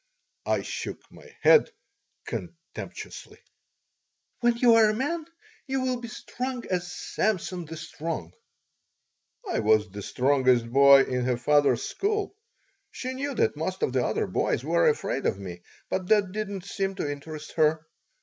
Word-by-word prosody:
I - - +1
shook - - -5
my - - -15 0.2
head 470 - +7 0.6
contemptuously - - -8 1.0
"When 240 -1 +2
you 235 -1 +6
are 225 -1 +6
a 215 - 0
man 305 +7 -2 0.4
you 265 0 -1
will 255 -1 -1
be 235 - -6
strong 250 +2 -5
as 180 -1 -1
Samson 180 -1 -2
the 160 +1 -8
Strong." 155 - -5 1.1
I - - 0
was 110 -1 +3
the 100 +1 -7
strongest 125 +2 +2
boy 140 +1 +8
in 125 -2 -2
her 125 -1 +1
father's 145 -2 +3
school. 410 0 -2 0.5
She 255 0 -5
knew 280 +2 -3
that 455 -1 +2
most - - -3
of 450 - 0
the - - +2
other - - 0
boys - - 0
were - - +3
afraid 440 - -1
of - - 0
me, 90 -3 -8 0.3
but 185 -1 -2
that 205 -3 +3
did 215 +1 -3
not 195 -2 -6
seem 195 -1 -2
to 170 - -2
interest 150 +1 -7
her. 155 0 +3
180 Hz, 155 wpm, -27 LUFS, -, 1.1 s, boy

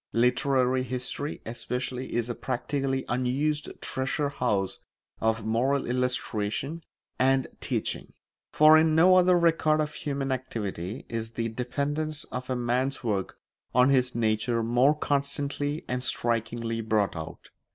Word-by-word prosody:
Literary 130 +1 +2
history, 130 +3 -4
especially, 125 +2 -4
is 120 -1 0
a 120 - -2
practically 135 +2 -2
unused 135 +5 0
treasure 140 +2 -1
house 105 -9 -1 0.4
of 110 -1 0
moral 130 +5 +1
illustration 125 +3 -1 0.4
and 130 0 +3
teaching; - - -3 0.4
for 155 +1 +7
in 160 0 +3
no 180 +3 +6
other 180 0 +5
record 160 -2 +3
of 150 0 -1
human 140 -2 -3
activity 110 -5 -4
is 115 0 -4
the 115 0 -2
dependence 145 +6 -2
of 125 0 -5
a 130 - 0
man's 125 +3 -1
work 100 -5 -2 0.4
on 125 +1 +6
his 125 -3 +2
nature 115 +1 +1
more 125 +6 +4
constantly 145 +1 -1
and 125 0 -2
strikingly 115 -1 -1
brought 110 -3 +1
out. 80 -1 -8
125 Hz, 130 wpm, -27 LUFS, 115-140 Hz, 0.4 s, for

